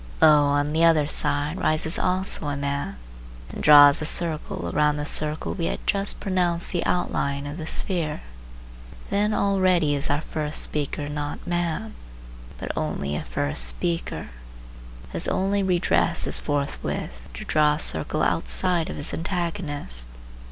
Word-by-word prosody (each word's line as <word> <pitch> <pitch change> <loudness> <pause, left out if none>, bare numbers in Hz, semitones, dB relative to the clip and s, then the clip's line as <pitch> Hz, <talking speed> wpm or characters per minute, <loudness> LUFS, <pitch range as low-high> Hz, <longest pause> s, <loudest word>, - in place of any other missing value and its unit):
Lo! 150 -2 +6
on 145 +1 0
the 160 +1 +2
other 160 -3 +5
side 145 +3 +1
rises 160 -1 +2
also 185 -4 -1
a 145 -1 -2
man 140 - -3 0.5
and - - -7
draws 145 -1 +8
a - - -2
circle 160 -1 0
around 150 0 +2
the 150 0 -3
circle 150 +1 +2
we 170 -4 -3
had - - -4
just 200 0 -1
pronounced 180 -3 -1
the 175 - -1
outline 140 -5 -1
of 145 +2 -6
the 160 -2 -6
sphere. 165 -5 0 0.9
Then 205 +1 +1
already 185 -7 +2
is 140 -1 +1
our 145 - +1
first 155 -2 -2
speaker 145 0 -3
not 145 0 -5
man, 175 +5 -2 0.6
but - - -5
only 70 +1 -3
a - - -3
first 60 0 -3
speaker. 165 - -3 0.8
His - - +3
only 200 +1 0
redress 175 - +1
is - - +2
forthwith 140 - -3
to - - -7
draw 150 -1 +3
a - - -7
circle 80 - -1
outside 165 - 0
of - - -5
his 145 - -5
antagonist. 165 - -4
155 Hz, 150 wpm, -24 LUFS, 145-175 Hz, 0.9 s, draws